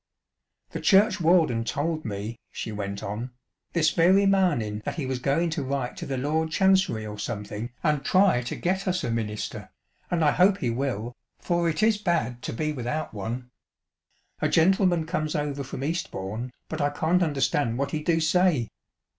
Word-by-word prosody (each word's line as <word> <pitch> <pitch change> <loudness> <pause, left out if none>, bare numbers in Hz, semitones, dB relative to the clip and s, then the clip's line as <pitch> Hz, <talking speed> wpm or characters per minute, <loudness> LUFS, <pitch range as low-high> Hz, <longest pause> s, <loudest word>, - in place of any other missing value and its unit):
" - - -56
The - - -4
churchwarden 180 - +4
told 155 +6 -2
me," 105 +2 -5
she 110 - -5
went 100 -1 -4
on, 105 +5 -4 0.2
" - - -49
this 160 -3 +3
very 185 +5 +4
marning 170 - +2
that - - -3
he 155 - -3
was 130 -1 -2
goin' 160 +6 +1
to 155 - -2
write 135 -2 -2
to - - -6
the 135 - -2
Lord 155 +4 0
Chancery 190 - +2
or 105 -1 -7
something 105 +2 -4
and 150 -4 +1
try 185 -6 +4
to 120 - -4
get 190 +2 -1
us 185 0 0
a 120 - -1
minister, 110 -2 -4 0.4
and 165 -3 +1
I 145 - +5
hope 190 +4 +4
he 120 -9 -1
will, 120 -2 -2 0.2
for 170 -1 0
it 165 +6 -1
is 220 -1 +3
bad 165 - -1
to - - -4
be 155 +6 -2
without 145 +4 -3
one. 120 +4 -5 0.9
A - - +2
gentleman 175 -1 +3
comes 155 -1 -2
over 145 -2 -2
from 135 0 -6
Eastbourne, 125 - -3 0.2
but 160 -1 -4
I 145 - +2
can't 160 +5 +1
understand 145 -6 +1
what 140 +1 -1
he 155 - -2
do 165 +1 +2
say. 160 -6 +2
150 Hz, 180 wpm, -26 LUFS, 120-170 Hz, 0.9 s, I